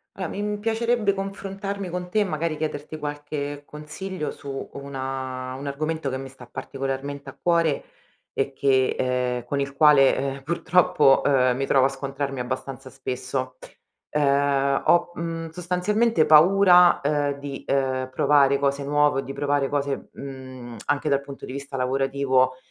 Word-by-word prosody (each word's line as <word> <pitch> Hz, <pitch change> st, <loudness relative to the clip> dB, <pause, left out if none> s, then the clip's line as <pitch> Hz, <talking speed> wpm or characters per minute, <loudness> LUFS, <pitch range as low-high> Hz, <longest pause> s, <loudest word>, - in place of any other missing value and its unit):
A 185 Hz, -2 st, -3 dB
mi 210 Hz, +3 st, -3 dB
piacerebbe 225 Hz, -1 st, +1 dB
confrontarmi 195 Hz, 0 st, -5 dB
con 180 Hz, 0 st, -5 dB
te 215 Hz, -, +1 dB
e -, -, +4 dB
magari 155 Hz, -2 st, -2 dB
chiederti 155 Hz, 0 st, -4 dB
qualche 145 Hz, -1 st, -5 dB
consiglio 155 Hz, +4 st, -6 dB
su 135 Hz, -1 st, -7 dB
una 130 Hz, -2 st, -5 dB
un 135 Hz, +2 st, -7 dB
argomento 155 Hz, +1 st, -2 dB
che 130 Hz, -, -3 dB
mi 135 Hz, 0 st, -7 dB
sta 130 Hz, -1 st, -13 dB
particolarmente 135 Hz, +2 st, -5 dB
a -, -, -13 dB
cuore 165 Hz, -4 st, +2 dB, 0.5 s
e 135 Hz, 0 st, -1 dB
che, 135 Hz, -1 st, +2 dB
ehm, 125 Hz, -1 st, -1 dB
con 140 Hz, +3 st, -1 dB
il 140 Hz, -, -2 dB
quale, 140 Hz, -2 st, +6 dB, 0.2 s
eh, -, -, -13 dB
purtroppo 160 Hz, -2 st, +3 dB
ehm, 130 Hz, -3 st, +3 dB
mi 135 Hz, +2 st, -1 dB
trovo 135 Hz, -1 st, +4 dB
a -, -, +5 dB
scontrarmi 135 Hz, 0 st, -4 dB
abbastanza 135 Hz, +2 st, -5 dB
spesso, 130 Hz, 0 st, -4 dB, 0.5 s
ehm, 140 Hz, -1 st, +2 dB
ho, 175 Hz, 0 st, +4 dB
uhm, 165 Hz, -1 st, -4 dB
sostanzialmente 180 Hz, +3 st, +1 dB
paura, 180 Hz, +3 st, +6 dB
ehm, 145 Hz, 0 st, 0 dB
di, 140 Hz, -1 st, -7 dB
ehm, 130 Hz, -1 st, 0 dB
provare 140 Hz, -1 st, +4 dB
cose 140 Hz, 0 st, 0 dB
nuove 145 Hz, -1 st, +2 dB
o -, -, -10 dB
di 135 Hz, -, -7 dB
provare 145 Hz, -1 st, 0 dB
cose, 140 Hz, -1 st, -2 dB
uhm, 130 Hz, -3 st, -9 dB
anche 145 Hz, +1 st, 0 dB
dal 140 Hz, -1 st, +2 dB
punto 140 Hz, 0 st, -9 dB
di -, -, -8 dB
vista 140 Hz, 0 st, -6 dB
lavorativo 130 Hz, 0 st, +1 dB
140 Hz, 155 wpm, -24 LUFS, 135-160 Hz, 0.5 s, quale